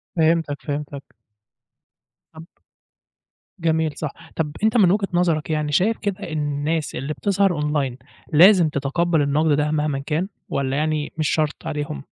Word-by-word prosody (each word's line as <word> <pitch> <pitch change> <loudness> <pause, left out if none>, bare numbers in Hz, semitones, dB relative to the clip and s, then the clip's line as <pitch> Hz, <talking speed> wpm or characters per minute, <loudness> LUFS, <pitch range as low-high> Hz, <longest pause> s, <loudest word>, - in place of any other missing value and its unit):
فهمتك، 160 -3 +2
فهمتك. 145 -1 -5 1.3
طب 160 +1 -10 1.2
جميل 160 -2 +1
صح 150 -3 -3 0.2
طب 155 -2 -1
أنت 220 +2 +3
من 190 -6 +5
وجهة 195 0 +1
نظرك 170 -3 +1
يعني 150 -1 -1
شايف 210 +9 +2
كده 200 -2 -3
إن 155 - -2
الناس 150 +2 -2
اللي 135 +4 -3
بتظهر 195 +2 +1
أونلاين 150 -4 -1 0.4
لازم 175 0 +7
تتقبّل 150 +3 0
النقد 150 +3 +2
ده 150 +1 +1
مهماً 150 -2 0
كان 155 +6 -2 0.2
والّا 135 0 -1
يعني 155 -1 -1
مش 155 -2 0
شرط 155 -2 0
عليهم. 145 - -4
155 Hz, 145 wpm, -22 LUFS, 145-170 Hz, 1.3 s, لازم